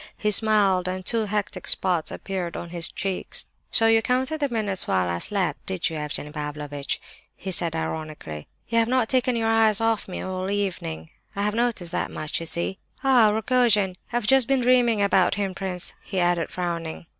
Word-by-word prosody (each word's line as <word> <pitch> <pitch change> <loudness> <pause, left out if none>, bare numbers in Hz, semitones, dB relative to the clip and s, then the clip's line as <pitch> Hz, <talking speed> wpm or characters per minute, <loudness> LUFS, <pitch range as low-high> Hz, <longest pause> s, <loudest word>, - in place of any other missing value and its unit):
He 210 - +1
smiled, 200 -4 +3
and 185 0 -3
two 225 -2 +1
hectic 210 0 -3
spots 180 -4 +1
appeared 185 -3 -4
on 170 - -7
his 170 -2 0
cheeks. 190 0 -3 0.2
"So 225 - +3
you 225 0 +5
counted 260 +6 0
the 285 -2 0
minutes 210 -5 -1
while 90 -1 +2
I 85 0 -1
slept, 195 - -1
did 185 -2 -1
you, - - -5
Evgenie 150 0 -3
Pavlovitch?" 150 -1 -4 0.4
he 190 - -5
said, 170 -2 +1
ironically. 155 - -5 0.2
"You 230 0 +2
have 225 - +3
not 250 -2 +2
taken 255 -1 +2
your 225 -1 0
eyes 220 -2 +4
off 225 -1 +1
me 185 - -5
all 185 0 -3
the 200 - 0
evening—I 185 - -4
have 210 0 +1
noticed 225 -7 -1
that - - -1
much, 155 - -3
you 165 - -6
see! 170 +4 -2 0.2
Ah, 250 -5 +6
Rogojin! 215 -3 +2 0.2
I've 240 -2 0
just 265 +1 +5
been 270 -1 +2
dreaming 240 -4 +4
about 190 -2 +3
him, 200 -2 -1
prince," 185 -1 -2
he 190 - -3
added, 175 -2 +1
frowning. 170 -2 -4
195 Hz, 190 wpm, -25 LUFS, 170-225 Hz, 0.4 s, Ah